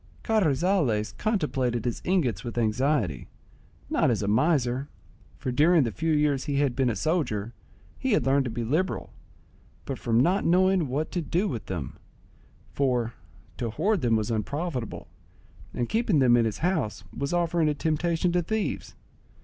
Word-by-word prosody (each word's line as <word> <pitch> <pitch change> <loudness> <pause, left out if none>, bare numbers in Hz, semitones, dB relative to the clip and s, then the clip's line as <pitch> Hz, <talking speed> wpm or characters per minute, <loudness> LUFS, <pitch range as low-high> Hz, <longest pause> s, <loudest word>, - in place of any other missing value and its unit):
Carrizales 165 - +1
contemplated 135 - 0
his 120 - -2
ingots 130 - 0
with 120 -1 -6
anxiety, 115 - 0 0.6
not - - +2
as - - 0
a - - -1
miser, 130 +2 +1 0.5
for, 130 - -3
during 155 +5 +4
the 115 - -1
few 160 - -1
years 150 -3 +2
he 145 -2 -2
had 140 -4 +1
been 130 -1 +2
a 115 - -1
soldier, 125 - -1 0.5
he 265 -3 0
had - - +2
learned 135 0 +3
to - - -2
be 115 +1 -3
liberal; 155 +11 -1 0.7
but 135 - -4
from 115 -1 +1
not 180 +9 +3
knowing 185 -1 +3
what 145 +5 -2
to 175 - -1
do 175 +6 0
with 115 - -5
them; 85 -9 -5 0.7
for 125 -4 0 0.4
to 120 - -2
hoard 200 - 0
them 115 -2 +2
was 110 +1 -1
unprofitable, 130 - -3 0.6
and 120 - -2
keeping 220 -6 +1
them 125 -3 +5
in 120 -1 +3
his 105 -3 -2
house 110 - -1
was 140 +1 -2
offering 170 -2 +1
a 150 - 0
temptation 165 +3 0
to 175 0 +2
thieves. 220 +5 -3
140 Hz, 165 wpm, -27 LUFS, 120-175 Hz, 0.7 s, them